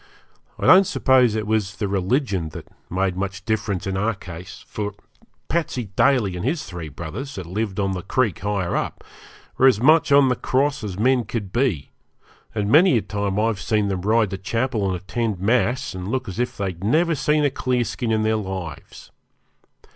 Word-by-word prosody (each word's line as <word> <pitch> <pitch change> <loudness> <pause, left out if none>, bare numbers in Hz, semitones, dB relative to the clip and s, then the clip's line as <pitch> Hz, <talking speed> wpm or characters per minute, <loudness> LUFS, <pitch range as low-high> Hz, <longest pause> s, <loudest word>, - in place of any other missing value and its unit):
I - - -3
don't 185 +1 +7
suppose 125 -4 +3
it 110 -1 -2
was 105 -3 0
the 105 - -2
religion 100 - 0
that - - -8 0.2
made 95 0 0
much 95 0 -4
difference 105 -4 -1
in 95 -1 -2
our 105 +3 0
case, 90 -1 -10
for 105 -1 -4 0.5
Patsey 130 - -2
Daly 120 -9 +3
and 90 - -5
his 150 +6 -1
three 85 -4 -7
brothers, 90 - -7
that 95 - -6
lived 100 +3 -3
on 100 -1 +1
the 95 -1 -3
creek 115 - 0
higher 100 -2 -1
up, - - -3 0.6
were 130 - +7
as 125 -6 +4
much 155 +4 +4
on 140 -1 +6
the 125 - +2
cross 135 +2 0
as 95 -3 -5
men 125 +3 +3
could 100 -3 -4
be, 120 - 0 0.6
and 105 -2 0
many 165 -1 +6
a 110 - -1
time 100 -1 -2
I've 110 -2 0
seen 105 -2 +1
them 95 -2 -2
ride 110 0 +2
to 95 - -4
chapel 115 +1 -1
and 95 - 0
attend 100 +3 -3
mass, 120 +5 +1
and 95 0 -6
look 130 +3 -2
as 95 +3 -6
if 125 0 -2
they'd 95 -3 -4
never 165 +10 +2
seen 150 0 +1
a 140 - +2
'clearskin' 125 -2 -1
in 110 -1 +1
their 110 0 +2
lives. 95 -5 -7
105 Hz, 190 wpm, -22 LUFS, 95-125 Hz, 0.6 s, don't